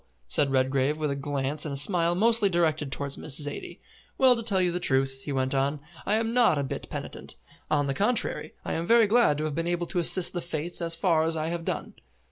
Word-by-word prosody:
said 140 - +1
Redgrave, 135 +2 +1
with 150 -2 -1
a - - -2
glance 140 +1 -2
and 150 - -3
a 140 - -3
smile 170 +3 +2
mostly 225 +1 +3
directed 155 -5 0
towards 140 0 -4
Miss 140 -2 +2
Zaidie. 145 -1 -5 0.4
"Well, 260 -2 +5
to 230 - -4
tell 210 -4 0
you 180 -1 +1
the 175 - -2
truth," 135 -3 0
he 145 - -4
went 130 0 -1
on, 140 +2 0 0.3
"I 205 - +2
am 225 +1 -1
not 240 -10 +4
a 140 - 0
bit 135 - -6
penitent. - - -7 0.3
On 145 -2 +1
the 135 - -1
contrary, 210 - 0
I - - -2
am 165 +1 -3
very 230 -1 +6
glad 210 -8 +3
to 155 - -3
have 155 -1 -2
been 165 +3 -2
able 175 0 -1
to 175 - -2
assist 175 +1 +3
the 175 - -3
Fates 170 +1 -4
as 165 0 -2
far 165 -2 +2
as 165 0 0
I 155 +1 -2
have 170 0 -4
done." - - -4
160 Hz, 240 wpm, -27 LUFS, 140-180 Hz, 0.4 s, very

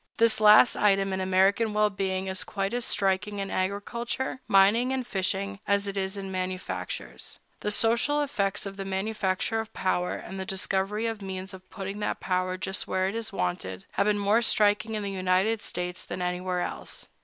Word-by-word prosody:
This 230 -1 +4
last 215 +2 +7
item 195 -1 +2
in 190 - -1
American 195 +4 +2
well 210 0 +3
being 190 -1 -2
is 190 -1 -1
quite 195 +1 -3
as 245 -1 0
striking 200 +1 +1
in 195 -1 -3
agriculture, 235 +7 -2
mining, 205 +6 +5
and 260 -1 -1
fishing, 195 -1 -2
as 200 0 +2
it 200 0 -3
is 190 0 -2
in 195 -1 -5
manufactures. 180 - -5 0.2
The - - -2
social 235 +7 +3
effects 205 -9 -1
of 195 0 -6
the 195 - -3
manufacture 195 +2 -1
of 220 0 -5
power, 180 -1 0
and - - -8
of 190 - -6
the 190 - -3
discovery 195 +3 -1
of 225 -2 -3
means 190 0 -5
of 185 0 -12
putting 195 +1 -6
that 210 - -2
power 185 0 -1
just 190 +1 -3
where 185 0 +1
it - - -5
is 225 -1 -4
wanted, 95 - -3
have 200 - +1
been 210 0 +3
more 205 +3 +3
striking 210 -1 +2
in 210 - -3
the 200 - -3
United 190 +4 +1
States 180 0 -4
than - - -6
anywhere 180 0 -1
else. - - -5
195 Hz, 190 wpm, -27 LUFS, 185-210 Hz, 0.2 s, last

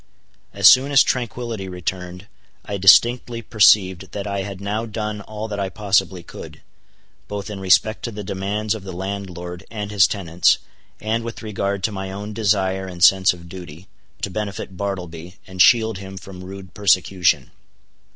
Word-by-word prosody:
As - - +5
soon 135 +3 +7
as 135 - +7
tranquility 115 -5 -3
returned 90 0 -5 0.4
I 100 - -4
distinctly 120 +4 +5
perceived 95 -4 +3
that 100 - -4
I 100 -1 -2
had 95 -1 -6
now 105 +3 -3
done 105 -1 -4
all 110 +1 -6
that 105 -2 -5
I 100 -1 -1
possibly 95 -2 0
could, - - -11 0.6
both 100 0 -5
in 100 - -6
respect 95 +3 +3
to 120 - -4
the 105 -1 -7
demands 100 +3 -2
of 110 - -6
the 95 -2 -7
landlord 90 -1 -6
and 105 -2 -5
his 100 -4 +5
tenants, 90 -4 +2 0.4
and 110 +2 -1
with 115 0 -7
regard 100 -2 -3
to 110 - +1
my 95 -1 -5
own 105 +2 -6
desire 95 -3 0
and 90 -1 -4
sense 95 0 +6
of 85 -1 -10
duty, 85 -1 -10 0.4
to 100 - -2
benefit 100 -2 -5
Bartleby, 90 -3 -5
and 95 -1 -2
shield 110 -3 +5
him 95 0 -9
from 95 -1 -10
rude 95 -1 -10
persecution. 95 -3 +2
100 Hz, 165 wpm, -21 LUFS, 95-105 Hz, 0.6 s, soon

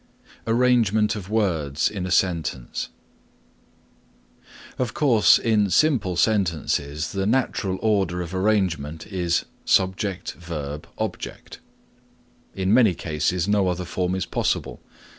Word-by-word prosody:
ARRANGEMENT 115 -3 +3
OF 100 -3 -7
WORDS 85 -10 0
IN 95 -3 -4
A - - -5
SENTENCE 85 -9 -1 1.9
Of 125 -2 -2
course 115 - +5
in 105 -3 +1
simple 110 - +2
sentences 85 -6 0
the 95 0 -1
natural 110 -6 0
order 100 -5 +1
of 85 +1 -8
arrangement 95 -6 0
is 90 -4 -1 0.2
subject 95 0 0
verb 75 -4 -6
object. - - -6 1.0
In 95 +1 +1
many 115 -7 +5
cases 85 +3 -1
no 105 -2 +2
other 90 0 -2
form 90 +1 -2
is 95 - -2
possible. - - -2
95 Hz, 110 wpm, -23 LUFS, 85-105 Hz, 1.9 s, course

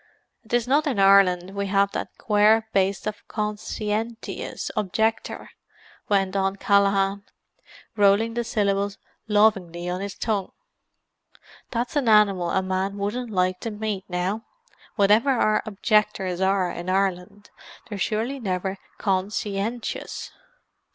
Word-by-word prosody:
"And 220 - -24
'tis 240 0 +1
not 290 +4 +2
in 260 -7 -1
Ireland 195 -2 +5
we 200 0 -2
have 200 0 +2
that - - -5
quare 215 +1 +3
baste 195 -1 +1
the 215 - -2
con 210 -1 -2
sci 210 0 -4
en 225 +2 -1
tious - - -6
objector," 220 +3 -1 0.6
went 195 -1 +1
on 195 0 +1
Callaghan, 200 0 +2 0.7
rolling 205 +2 +3
the 240 0 -1
syllables 200 -2 0 0.3
lovingly 195 -5 +2
on 180 +1 -3
his 200 -1 -5
tongue. 205 -4 -2 1.2
"That's 240 +3 -3
an 275 -6 +2
animal 200 -5 +4
a 190 - +1
man 190 +1 -2
wouldn't 220 +5 -3
like 185 -2 0
to 230 - -4
meet, 210 -2 -4
now! 185 +5 -2 0.5
Whatever 210 +5 +4
our 215 -5 +2
objectors 205 -3 +1
are 190 -1 +2
in 175 +1 -6
Ireland, 195 +1 -1 0.4
they're 205 -2 -6
surely 230 +7 -1
never 190 -3 -2 0.2
con 190 -2 0
sci 210 0 -3
en 230 +4 -2
tious!" - - -6
200 Hz, 140 wpm, -24 LUFS, 190-220 Hz, 1.2 s, Ireland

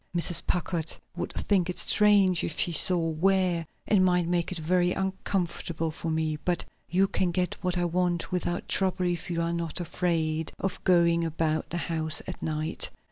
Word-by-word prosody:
Mrs. 170 0 +1
Packard 170 -2 -1 0.2
would - - -4
think 185 -3 0
it 180 - -3
strange 200 -4 +4
if 155 - -3
she 175 - +2
saw 170 0 +5
where, 180 0 +1 0.2
and 200 -3 +3
might 180 -2 +2
make 175 0 0
it 180 - -2
very 175 +2 +1
uncomfortable 175 -4 -2
for 165 +1 -5
me. 160 -1 -1
But 175 +3 -2 0.2
you 190 +2 +3
can 185 -1 0
get 180 +1 -1
what 180 0 0
I 175 - +1
want 175 0 -1
without 175 -1 -2
trouble 185 -1 0
if 175 -1 -2
you 170 -1 -1
are 170 0 -1
not 170 0 -3
afraid 165 -2 -1
of 195 -1 -4
going 170 -2 +4
about 160 -1 -1
the 175 - -3
house 160 -2 -1
at 185 - -7
night. 155 +1 -2
175 Hz, 180 wpm, -27 LUFS, 165-180 Hz, 0.2 s, saw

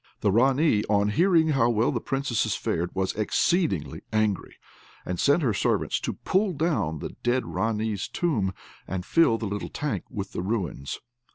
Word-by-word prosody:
The 100 - +3
Ranee, 130 +1 +3
on 105 0 +3
hearing 165 - +3
how 130 -5 +3
well 115 0 +2
the 120 -5 -2
Princesses 135 -4 -1
fared, 85 +1 -1
was 95 0 0
exceedingly 110 - 0
angry, 110 -3 0 0.5
and 90 -1 -3
sent 145 +4 +3
her 120 -5 +2
servants - - 0
to - - -3
pull 190 0 0
down 145 - 0
the - - -5
dead 125 +1 +1
Ranee's 110 -2 -1
tomb, 115 - 0 0.4
and 90 -1 -4
fill 165 -9 +4
the 115 - -4
little 105 0 -4
tank 150 -1 -3
with 100 -5 -5
the - - -3
ruins. 90 - -3
110 Hz, 165 wpm, -26 LUFS, 100-145 Hz, 0.5 s, fill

